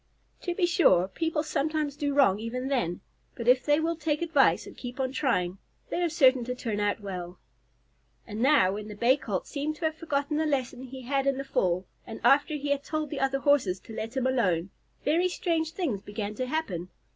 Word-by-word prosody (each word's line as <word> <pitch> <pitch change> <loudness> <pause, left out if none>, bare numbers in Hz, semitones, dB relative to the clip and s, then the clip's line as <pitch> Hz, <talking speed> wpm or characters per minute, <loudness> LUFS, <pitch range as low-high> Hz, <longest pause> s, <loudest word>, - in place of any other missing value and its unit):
To 350 -2 -3
be 360 - +3
sure, 190 - +4
people 320 - -1
sometimes 310 -1 -1
do 285 -1 -1
wrong 210 -9 +4
even 250 +4 -3
then, 230 -11 -1 0.3
but 235 - -6
if 250 0 +5
they 295 +1 +3
will 330 +1 0
take 310 0 -1
advice 320 -5 +3
and - - -11
keep 245 +1 -8
on 260 -1 0
trying 195 -10 0 0.3
they 350 - -1
are 345 - +2
certain 265 -6 +4
to 250 +1 -3
turn 225 -4 -3
out 205 +1 0
well. 180 -3 -6 0.9
And 215 0 -5
now, 260 -9 +5
when 210 +1 -5
the 210 - -8
Bay 240 +5 +4
Colt 205 -9 -3
seemed 300 +1 -3
to 320 - -4
have 315 - +1
forgotten 300 -2 -2
the 315 0 +1
lesson 260 -3 -2
he 260 +1 -9
had 275 +2 0
in 275 -1 +2
the 275 - -3
fall, 185 -8 0 0.2
and 225 - -7
after 290 +2 +4
he 290 0 -3
had 285 0 0
told 310 -1 -3
the 295 - -3
other 270 0 +1
Horses 260 -11 +3
to 225 - -11
let 225 +4 -5
him 260 - +1
alone, 195 -9 +1 0.3
very 340 +5 +3
strange 330 -3 -1
things 275 - -2
began 205 0 -5
to 255 +3 -3
happen. 200 - -3
270 Hz, 215 wpm, -28 LUFS, 215-300 Hz, 0.9 s, if